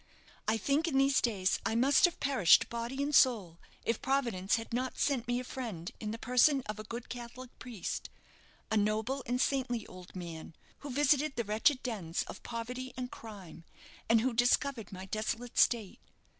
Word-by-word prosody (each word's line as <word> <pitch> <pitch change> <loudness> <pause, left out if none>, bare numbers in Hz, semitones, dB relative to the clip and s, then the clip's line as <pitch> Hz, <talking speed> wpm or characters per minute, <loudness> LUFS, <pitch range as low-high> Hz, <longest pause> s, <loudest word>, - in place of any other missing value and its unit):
I 220 +1 +2
think 285 - +1
in 280 -5 +1
these 275 0 +4
days 195 -5 +1
I 225 - -1
must 265 +8 +5
have 350 - -1
perished 260 -12 +5
body 235 +4 -3
and 290 +1 -2
soul 200 - +4 0.3
if 230 - 0
Providence 235 -9 +1
had 225 0 -5
not 255 +2 -2
sent 255 -5 0
me 245 0 0
a - - -4
friend 225 -10 -6
in 215 - -4
the 225 - -4
person 250 +4 +3
of 215 0 -5
a - - -5
good 230 +3 -7
Catholic 245 +1 -8
priest 235 -8 -5 0.6
a 220 - +3
noble 215 +6 0
and 250 +1 0
saintly 255 -4 0
old 185 0 -12
man 165 -3 -7 0.2
who 285 - -8
visited 285 +2 +2
the 235 - -1
wretched 240 +7 +2
dens 190 -9 -2
of - - -9
poverty 250 +3 -5
and 250 -1 -4
crime, 200 -7 -10 0.5
and 225 -1 +5
who 255 +1 0
discovered 245 0 +1
my 185 0 -7
desolate 220 +4 -3
state. 225 -6 +2
235 Hz, 180 wpm, -32 LUFS, 215-260 Hz, 0.6 s, must